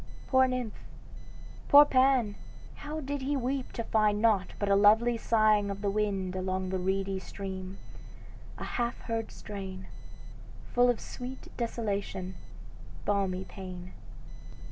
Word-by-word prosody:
Poor 260 -1 +4
nymph 250 -4 -3 0.9
poor 290 +1 +10
Pan 255 -5 +3 0.4
how 300 +1 -6
he - - -9
did 280 -1 -3
weep 260 +1 -2
to 230 - -4
find 215 -2 +2
Nought 210 -4 +2
but 205 - -1
a 200 - +4
lovely 220 +4 +5
sighing 215 -2 +3
of 200 0 -5
the 200 -2 0
wind 195 -3 -1
Along 185 0 -2
the 190 0 -1
reedy 190 +1 -1
stream; 190 0 -7 0.8
a - - -6
half 240 0 -2
heard 225 -1 -3
strain. 190 -2 -7 0.9
Full 245 0 +5
of 245 - +1
sweet 255 +1 -8
desolation, 200 -5 -3 0.7
balmy 195 -2 0
pain." 185 -2 -8
210 Hz, 130 wpm, -30 LUFS, 190-240 Hz, 0.9 s, poor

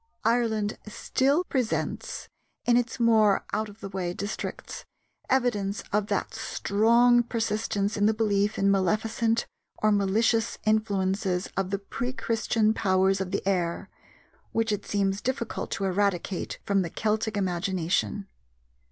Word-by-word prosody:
Ireland 225 -3 +1
still 275 +8 +1
presents, 255 -9 -2 0.4
in 240 - +4
its 240 -1 0
more 220 -4 +4
out 215 0 -1
of 205 +2 -15
the - - -5
way 185 -2 -3
districts, 205 +1 -5 0.5
evidence 215 -6 +1
of 210 0 +1
that 205 +1 -2
strong 230 +2 +3
persistence 220 -3 -1
in 205 0 +3
the 220 - +3
belief 210 -1 +1
in 195 0 +3
maleficent 220 +4 +1 0.3
or 215 - +2
malicious 220 +3 +2
influences 195 -3 0
of 195 -1 -1
the 200 - 0
pre 240 +5 -4
Christian 225 -3 +1
powers 190 -2 +2
of 190 - -3
the 195 0 -3
air, 175 -3 -1 0.6
which 225 -1 +1
it 205 -1 -3
seems 195 -1 0
difficult 245 -3 -3
to - - -3
eradicate 190 -1 -1
from 200 -1 +2
the 175 - -2
Celtic 220 +2 -1
imagination. 190 +1 -1
210 Hz, 135 wpm, -27 LUFS, 195-225 Hz, 0.6 s, in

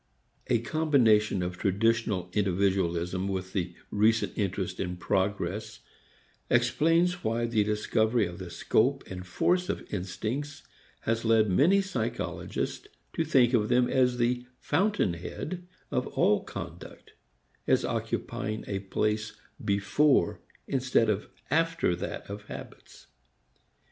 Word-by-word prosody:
A 125 - +3
combination 115 - +3
of 90 0 -4
traditional 100 -2 +1
individualism 95 -2 +1
with 95 -1 -3
the 90 -4 -2 0.2
recent 110 +2 +2
interest 95 -2 -2
in 90 -1 -3
progress 100 +3 -1 0.7
explains 165 +9 +2
why 115 +1 0
the 115 -2 +2
discovery 110 +2 +1
of 85 0 -7
the 90 -2 -7
scope 125 +10 +1
and 90 -1 -8
force 180 - +1
of - - -3
instincts 110 +10 -4 0.4
has 115 0 -1
led 110 -3 +4
many 175 - +5
psychologists 120 - -3 0.3
to 165 - 0
think 130 -6 +4
of 110 -3 +2
them 125 0 +4
as 125 -1 +2
the 120 +1 +1 0.2
fountain 190 - +1
head 165 - -6 0.2
of - - 0
all - - +2
conduct, - - -9 0.5
as - - +3
occupying 110 +1 -3
a 100 -1 -2
place 105 +2 -1 0.3
before 100 - +2 0.3
instead 130 -4 +2
of 105 0 -3 0.2
after 165 - +2
that 90 - -5
of 105 +1 -8
habits. - - -10
110 Hz, 120 wpm, -28 LUFS, 95-125 Hz, 0.7 s, many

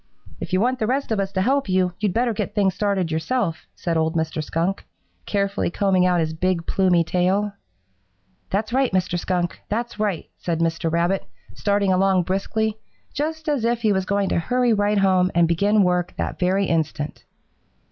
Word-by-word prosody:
"'If - - -6
you 185 - +2
want 250 +4 +1
the 215 - 0
rest 265 +1 -1
of 215 - +1
us 195 0 -1
to 190 -1 +1
help 270 -1 +1
you, 185 -1 +2
you'd 205 -2 +1
better 235 +3 +1
get - - -4
things 195 -3 +2
started 200 -5 0
yourself,' 165 +2 -1
said 170 -2 -1
old 160 +1 0
Mr. 160 -1 -1
Skunk, 170 +5 -1 0.4
carefully 200 -1 0
combing 185 0 +2
out 180 -1 +2
his 160 -1 -1
big, 175 +1 -1
plumy 180 -3 +3
tail. 190 +4 0 1.0
"'That's 215 +4 -1
right, 265 -1 +2
Mr. 180 -1 0
Skunk! 175 -1 -2
That's 235 +1 -3
right!' 205 -6 -1
said 170 -2 -2
Mr. 165 0 0
Rabbit, 170 +3 +1 0.3
starting 200 -2 +1
along 190 -1 +3
briskly, 215 +4 -1 0.3
just 315 +2 -3
as 290 -6 0
if 235 0 0
he 215 -2 +3
was 190 -1 0
going 200 0 0
to - - +1
hurry 245 +6 +2
right 205 0 +1
home 185 -2 +3
and 170 -1 +4
begin 200 +5 +3
work 180 -1 0
that - - -3
very 190 +2 +2
instant. 155 -3 -2
190 Hz, 185 wpm, -22 LUFS, 175-210 Hz, 1.0 s, and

